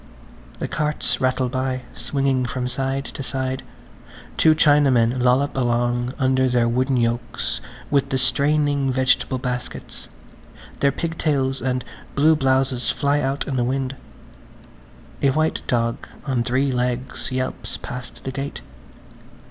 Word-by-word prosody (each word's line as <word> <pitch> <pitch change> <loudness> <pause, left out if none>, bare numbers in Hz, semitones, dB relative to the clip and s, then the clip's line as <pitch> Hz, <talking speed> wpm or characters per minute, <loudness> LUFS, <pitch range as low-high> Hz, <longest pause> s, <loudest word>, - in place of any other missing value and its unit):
The - - -3
carts 150 0 -1
rattle 130 0 +2
by, 130 0 -2
swinging 135 -3 0
from 125 -1 -2
side 135 +2 -1
to - - -7
side; 130 0 -2 0.7
two 155 -1 +5
Chinamen 130 -6 +4
lollop 130 +3 +3
along 120 0 0
under 130 -1 +2
their 120 -1 +3
wooden 130 +3 +1
yokes 120 0 -1 0.3
with 140 -1 +2
the 135 - +1
straining 140 +1 +2
vegetable 130 0 +2
baskets–their 125 +2 -5
pigtails 145 -5 -1
and 130 0 -1 0.3
blue 155 +3 +5
blouses 130 -3 +1
fly 145 +1 +1
out 135 +1 -1
in 135 - -1
the 120 - +2
wind. 130 +1 -1 1.3
A 140 - +4
white 155 +4 +1
dog 115 -1 0 0.2
on 130 -4 0
three 130 +3 +1
legs 125 +1 -2
yelps 130 0 -3
past 125 0 -8
the 135 - -3
gate. 135 +1 -5
130 Hz, 125 wpm, -22 LUFS, 125-140 Hz, 1.3 s, two